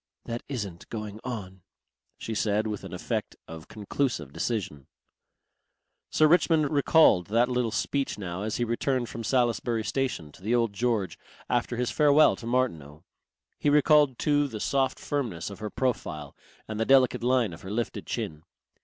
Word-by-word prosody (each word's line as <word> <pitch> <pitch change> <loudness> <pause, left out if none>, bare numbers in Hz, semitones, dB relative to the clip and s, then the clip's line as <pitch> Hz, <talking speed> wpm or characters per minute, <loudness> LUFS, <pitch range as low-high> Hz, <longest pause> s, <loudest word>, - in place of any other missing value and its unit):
"That 120 0 -4
isn't 100 -10 -5
going 105 -2 -6
on," 95 -7 -6 0.6
she 115 - -5
said 105 0 +1
with 105 -2 -4
an - - -8
effect - - -3
of 80 -1 -9
conclusive 105 - -2
decision. 80 - -3 1.2
Sir 155 - +4
Richmond 160 -3 +3
recalled 145 - +4
that 115 +4 +2
little 125 -2 0
speech 135 +5 -1
now 95 -2 -5
as 105 +1 -2
he 120 - 0
returned 120 +1 -1
from 115 - -6
Salisbury 120 -1 +1
station 125 - -2
to - - -18
the 110 +5 +1
Old 115 -3 +1
George 110 -5 -1 0.3
after 120 0 0
his 125 0 -1
farewell 150 0 +5
to 115 - -8
Martineau. 85 - -1 0.6
He 145 - +2
recalled 145 -2 +4
too 145 -1 +2
the 110 -5 -7
soft 135 +3 0
firmness 115 - -3
of 100 - -10
her 105 0 -4
profile 80 - -3 0.3
and 110 0 -5
the 115 - +1
delicate 130 -2 +4
line 125 -6 +2
of 80 - -11
her 95 - -8
lifted 115 +3 -3
chin. 75 -1 -4
115 Hz, 160 wpm, -27 LUFS, 100-130 Hz, 1.2 s, farewell